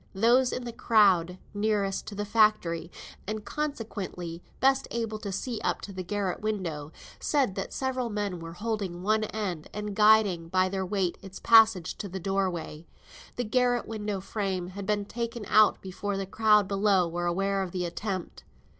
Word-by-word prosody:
Those 245 +5 +4
in 250 - -3
the 235 - -5
crowd 190 -7 +3 0.2
nearest 205 -1 -1
the 205 - -2
factory, 205 -6 +2 0.4
and 215 0 -4
consequently 205 - -4 0.2
best 270 0 +3
able 225 -2 -3
to 205 -2 -5
see 220 +3 -3
up - - 0
to 200 - -8
the 185 - -4
garret 190 0 -2
window, 170 -9 -3 0.3
said 275 -9 +1
that 195 0 -4
several 260 -2 -2
men 205 -4 -3
were 165 0 -8
holding 195 -3 -3
one 215 +2 +2
end, 195 -7 -4
and 210 -1 -4
guiding 210 -5 +4
by 185 +1 +2
their 190 0 -2
weight 190 -2 -1
its 195 -1 -10
passage 220 -6 +5
to 200 - -5
the 190 +2 -5
door 195 +1 0
way. 165 -2 -7 0.5
The 245 - -1
garret 245 +1 +1
window 210 -3 -3
frame 190 -3 -3
had 195 +1 -7
been 205 -1 0
taken 235 0 -4
out 215 +2 +5
before 195 +1 -3
the 195 - -2
crowd 210 0 +3
below 195 -2 +3
were 175 +1 -2
aware 195 +3 0
of 190 - -3
the 180 0 -2
attempt. 185 +1 -4
200 Hz, 170 wpm, -28 LUFS, 185-220 Hz, 0.5 s, passage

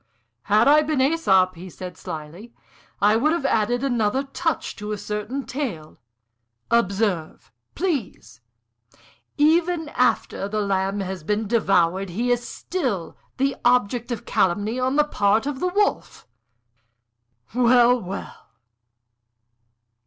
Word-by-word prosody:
"Had 210 +4 +4
I 300 +2 +6
been 305 -1 -1
Æsop," 260 - +3
he 185 +2 -10
said, 180 +1 -8
slyly, 165 +10 -9 0.4
"I 210 +2 +4
would 300 +8 +2
have 335 -5 -2
added 240 +3 +1
another 245 -1 +1
touch 320 +4 -3
to 210 +1 -6
a 210 - -2
certain 210 +7 -4
tale. 215 - -5 0.7
Observe, 195 - 0 0.2
please! 305 - -3 1.0
even 320 +1 +2
after 250 -6 0
the 215 +1 -2
Lamb 195 0 -1
has 190 -3 -5
been 210 +5 -1
devoured 195 -4 +2
he 235 +8 -1
is 245 0 +1
still 255 - -3 0.2
the 275 +1 +1
object 245 0 +2
of 235 - -4
calumny 205 +6 0
on 260 +2 0
the 300 - +5
part 215 -5 +1
of 280 -2 -3
the 365 - 0
Wolf! 410 +3 -1 1.3
Well, 245 0 +4
well! 190 +2 -8
230 Hz, 125 wpm, -23 LUFS, 195-275 Hz, 1.3 s, I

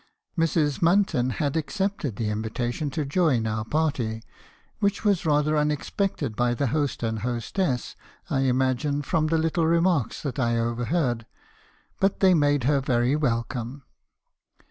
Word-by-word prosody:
Mrs. 160 -4 +1
Munton 165 -8 +2
had 145 -1 -1
accepted 170 - -2
the 110 +1 -2
invitation 120 +7 -2
to 150 +2 -2
join 140 -6 +2
our 110 0 -1
party, 120 -5 -1 0.6
which 200 0 0
was 190 -5 +2
rather 150 0 +2
unexpected 150 - -1
by 120 +2 +1
the 140 - 0
host 145 -6 -1
and 110 -1 -1
hostess, 125 - -2 0.3
I - - 0
imagine, 130 +2 +1
from 155 +2 +1
little 165 +1 +1
remarks 170 -6 +1
that 140 -1 -3
I 120 -2 +1
overheard; 120 +1 -1 0.7
but 195 0 +1
they 190 -1 +5
made 145 -4 +2
her 140 +2 +2
very 125 0 +1
welcome. 125 -1 -2
145 Hz, 135 wpm, -25 LUFS, 120-160 Hz, 0.7 s, they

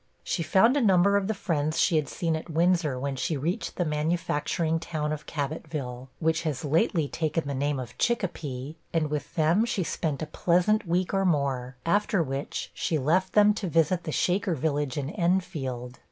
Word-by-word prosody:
She 170 - -1
found 195 - +4
a 290 - +2
number 200 -2 +4
of 200 -1 +1
the 220 - 0
friends 155 -5 -1
she 170 - +3
had 145 -4 -1
seen 165 -2 -1
at 160 - -6
Windsor 165 -4 +2
when 140 +1 -2
she 150 +4 -1
reached 165 +7 -2
the 175 - 0
manufacturing 160 +1 0
town 155 -2 -3
of 150 - -7
Cabotville, 140 -4 -4
(which 160 0 +1
has 150 -4 -3
lately 160 +1 +2
taken 160 0 -2
the 140 - -2
name 140 +1 -1
of 125 -3 -7
Chicopee,) 160 - -2 0.2
and 155 -3 0
with 150 +2 -4
them 165 +5 +3
she 230 -5 -1
spent 155 -2 -2
a - - -1
pleasant 180 +6 +1
week 180 +3 0
or 195 0 +2
more; 135 -7 0
after 200 +1 +2
which, 135 0 -4
she 160 - -1
left 170 +7 +1
them 210 0 +6
to 205 -4 -3
visit 165 +2 +2
the 155 - -4
Shaker 180 +2 +1
village 145 -2 -1
in 145 +1 -2
Enfield. 165 - -2
160 Hz, 185 wpm, -27 LUFS, 145-180 Hz, 0.2 s, them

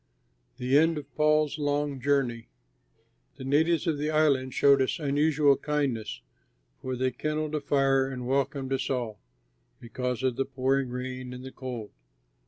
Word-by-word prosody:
THE 130 +3 +3
END 165 0 +3
OF 145 -1 -8
PAUL'S 155 0 +2
LONG 145 -2 -1
JOURNEY 130 -4 0 0.9
The 135 - -9
natives 160 +6 +2
of 160 -4 0
the 150 +1 -1
island 145 -4 +2
showed 140 -1 +5
us 130 - 0
unusual 145 -1 +3
kindness, 135 -8 -2 0.6
for 130 0 -3
they 130 +1 0
kindled 155 +4 -3
a 150 - -1
fire 135 -1 +2
and 130 -2 -5
welcomed 135 +1 -1
us 135 - -1
all, 120 -6 -2 0.6
because 125 +1 -4
of 130 -2 0
the 135 - +1
pouring 135 0 0
rain 125 0 -5
and 125 0 -8
the 130 - -7
cold. 125 -6 -6
135 Hz, 155 wpm, -28 LUFS, 130-150 Hz, 0.9 s, showed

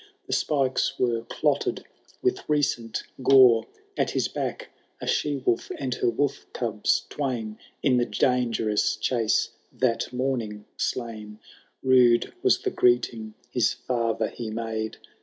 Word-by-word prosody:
The - - -3
spikes 135 -4 +1
wero 115 -2 0
clotted 145 -2 0 0.4
with 380 0 0
recent 135 -6 0 0.2
goro; 125 -4 +6 0.3
At - - +1
his - - 0
back - - -4 0.3
a - - -6
she 145 -1 0
wolf, 115 - +1
and 130 -3 -2
her - - +1
wolf 140 +4 -1
cubs 110 -4 0
twain. 120 -7 -3 0.2
In 130 -3 +4
the 120 - +2
dangerous 115 -5 +1
chase 110 0 +1 0.2
that 125 -2 0
morning 120 -5 -2
slain. 110 -3 -4 0.5
Rude 125 -2 +4
was 385 - +4
the 390 - 0
greeting 120 - +1 0.2
his 120 -3 +2
father 115 -3 -1
he 115 -2 -6
made. 110 0 -3
120 Hz, 130 wpm, -26 LUFS, 115-130 Hz, 0.5 s, goro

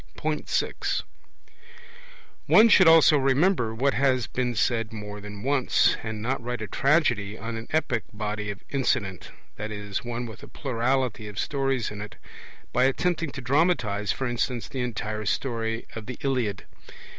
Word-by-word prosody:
(6) - - -1 1.4
One 225 +2 +7
should 190 -5 +7
also 160 -2 +7
remember 135 - +2
what 135 +4 +2
has 130 -3 +2
been 125 0 -2
said 115 +1 +1
more 105 -1 -7
than 105 0 -8
once, 135 -1 +3
and 110 -1 -5
not 130 +3 -1
write 120 -2 -3
a - - -5
tragedy 120 -9 +1
on 115 +3 -5
an 115 0 -6
epic 125 -8 0
body 105 0 -4
of 100 0 -6
incident 100 -9 -1 0.3
(i.e. 105 -1 -6
one 120 0 -4
with 110 -1 -10
a - - -11
plurality 125 -3 -1
of 105 -1 -9
stories 135 -4 -1
in 105 -1 -7
it), 105 - -8 0.6
by 125 - +4
attempting 165 +4 0
to - - -6
dramatize, 125 - +1
for 135 - -3
instance, 120 -2 -2
the 130 - -4
entire 110 -3 -3
story 115 -3 -1
of 110 -2 -7
the 125 - -6
Iliad. 125 -8 -1
120 Hz, 155 wpm, -26 LUFS, 105-135 Hz, 1.4 s, One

